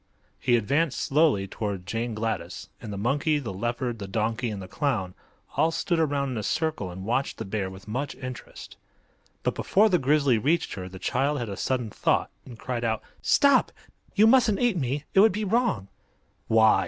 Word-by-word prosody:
He 125 Hz, -2 st, +3 dB
advanced 140 Hz, +7 st, +1 dB
slowly 140 Hz, -10 st, +2 dB
toward 100 Hz, -3 st, -4 dB
Jane 115 Hz, +5 st, -3 dB
Gladys, 110 Hz, -5 st, -4 dB
and 110 Hz, -, -7 dB
the 100 Hz, -, -5 dB
monkey, 145 Hz, -, +1 dB
the 120 Hz, -9 st, -4 dB
leopard, 120 Hz, +3 st, -2 dB
the 100 Hz, -, -5 dB
donkey 115 Hz, +5 st, -1 dB
and 105 Hz, -2 st, -5 dB
the 95 Hz, -, -8 dB
clown 110 Hz, -7 st, -1 dB, 0.4 s
all 160 Hz, -, +3 dB
stood 170 Hz, +1 st, 0 dB
around 140 Hz, -3 st, 0 dB
in 125 Hz, -, -3 dB
a -, -, -2 dB
circle 155 Hz, -, -1 dB
and 95 Hz, +2 st, -8 dB
watched 125 Hz, +5 st, -1 dB
the -, -, -5 dB
bear 95 Hz, -1 st, -2 dB
with 95 Hz, +2 st, -12 dB
much 130 Hz, +6 st, -3 dB
interest. 130 Hz, -2 st, -9 dB, 0.7 s
But -, -, +1 dB
before 215 Hz, +3 st, +3 dB
the 180 Hz, -3 st, +3 dB
grizzly 140 Hz, -3 st, +3 dB
reached 160 Hz, +8 st, +1 dB
her 95 Hz, -2 st, -6 dB
the 95 Hz, -, -10 dB
child 140 Hz, +9 st, 0 dB
had 120 Hz, -4 st, -3 dB
a 100 Hz, -, -4 dB
sudden 125 Hz, 0 st, -1 dB
thought, -, -, +1 dB, 0.2 s
and 120 Hz, -3 st, -10 dB
cried 120 Hz, 0 st, -4 dB
out: 110 Hz, -2 st, -1 dB, 0.2 s
"Stop! 280 Hz, -2 st, +4 dB, 0.4 s
You 215 Hz, -, +6 dB
mustn't 225 Hz, -4 st, +5 dB
eat 240 Hz, -4 st, +2 dB
me. 140 Hz, -2 st, -1 dB
It -, -, +5 dB
would 220 Hz, +3 st, +7 dB
be 210 Hz, +3 st, -3 dB
wrong." 210 Hz, -, +1 dB, 0.6 s
"Why?" 110 Hz, -1 st, +5 dB
125 Hz, 190 wpm, -26 LUFS, 105-155 Hz, 0.7 s, would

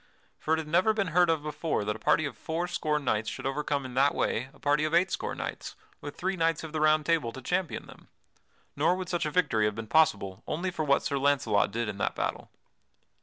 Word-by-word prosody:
For 160 Hz, -, +1 dB
it -, -, -4 dB
had 160 Hz, -1 st, -4 dB
never 185 Hz, +7 st, +3 dB
been 200 Hz, -4 st, 0 dB
heard 175 Hz, 0 st, +5 dB
of 160 Hz, -2 st, +1 dB
before 150 Hz, -6 st, -2 dB
that 105 Hz, 0 st, -1 dB
a -, -, -9 dB
party 155 Hz, -, +2 dB
of 140 Hz, -, -5 dB
four 165 Hz, +2 st, -3 dB
score 155 Hz, -3 st, -1 dB
knights 110 Hz, -7 st, -1 dB
should -, -, -7 dB
overcome 140 Hz, 0 st, -1 dB
in 130 Hz, -, -7 dB
that 135 Hz, +3 st, +3 dB
way 125 Hz, +4 st, -1 dB
a -, -, -20 dB
party 145 Hz, +1 st, +1 dB
of 155 Hz, +2 st, +1 dB
eight 180 Hz, +1 st, +3 dB
score -, -, -3 dB
knights, -, -, -6 dB, 0.2 s
with 145 Hz, -, -8 dB
three 190 Hz, +2 st, -1 dB
knights 165 Hz, -2 st, 0 dB
of 160 Hz, -1 st, -8 dB
the 155 Hz, -, -1 dB
Round 155 Hz, 0 st, +4 dB
Table 160 Hz, -8 st, +1 dB
to 130 Hz, -, -9 dB
champion 180 Hz, +4 st, -2 dB
them. -, -, -15 dB, 0.7 s
Nor 160 Hz, +5 st, +2 dB
would 185 Hz, -1 st, -5 dB
such 175 Hz, -3 st, 0 dB
a -, -, -1 dB
victory 130 Hz, -10 st, +2 dB
have 105 Hz, -1 st, 0 dB
been 115 Hz, 0 st, -5 dB
possible 100 Hz, -9 st, +2 dB
only 175 Hz, +4 st, -2 dB
for 160 Hz, -, -3 dB
what 140 Hz, -2 st, +2 dB
Sir 140 Hz, -, -1 dB
Launcelot 135 Hz, -7 st, +2 dB
did 115 Hz, +2 st, -2 dB
in 100 Hz, -1 st, -5 dB
that -, -, -1 dB
battle. -, -, -3 dB
150 Hz, 240 wpm, -28 LUFS, 130-165 Hz, 0.7 s, heard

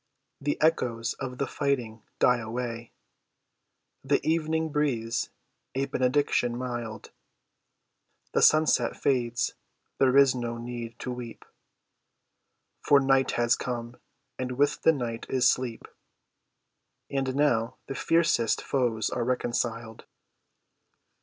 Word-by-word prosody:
The 145 Hz, +1 st, -2 dB
echoes 120 Hz, -8 st, +1 dB
of 125 Hz, -1 st, -5 dB
the 140 Hz, -, 0 dB
fighting 125 Hz, -7 st, -2 dB, 0.2 s
die 125 Hz, -1 st, +4 dB
away. 115 Hz, 0 st, -5 dB, 1.1 s
The 140 Hz, +1 st, +2 dB
evening 160 Hz, 0 st, 0 dB
breathes 125 Hz, -7 st, -1 dB, 0.5 s
a 135 Hz, +1 st, +1 dB
benediction 130 Hz, -2 st, +1 dB
mild. 120 Hz, -4 st, -5 dB, 1.2 s
The -, -, +1 dB
sunset 155 Hz, 0 st, +4 dB
fades. 120 Hz, -3 st, 0 dB, 0.5 s
There 135 Hz, 0 st, +4 dB
is 140 Hz, -2 st, +6 dB
no 120 Hz, -2 st, -4 dB
need 120 Hz, -1 st, -6 dB
to 125 Hz, -, -4 dB
weep, 125 Hz, -2 st, -8 dB, 1.4 s
For 145 Hz, -, +5 dB
night 135 Hz, -1 st, +2 dB
has 120 Hz, 0 st, +3 dB
come, 120 Hz, -1 st, -5 dB, 0.4 s
and 125 Hz, 0 st, -2 dB
with 140 Hz, +3 st, +1 dB
the -, -, +6 dB
night 120 Hz, -6 st, -4 dB
is 130 Hz, -1 st, +3 dB
sleep, 125 Hz, -3 st, -1 dB, 1.2 s
And 135 Hz, -1 st, -1 dB
now 130 Hz, -4 st, +2 dB
the -, -, -5 dB
fiercest 165 Hz, -5 st, +2 dB
foes 120 Hz, -5 st, 0 dB
are -, -, -1 dB
reconciled. 120 Hz, -2 st, -2 dB
125 Hz, 110 wpm, -27 LUFS, 120-140 Hz, 1.4 s, is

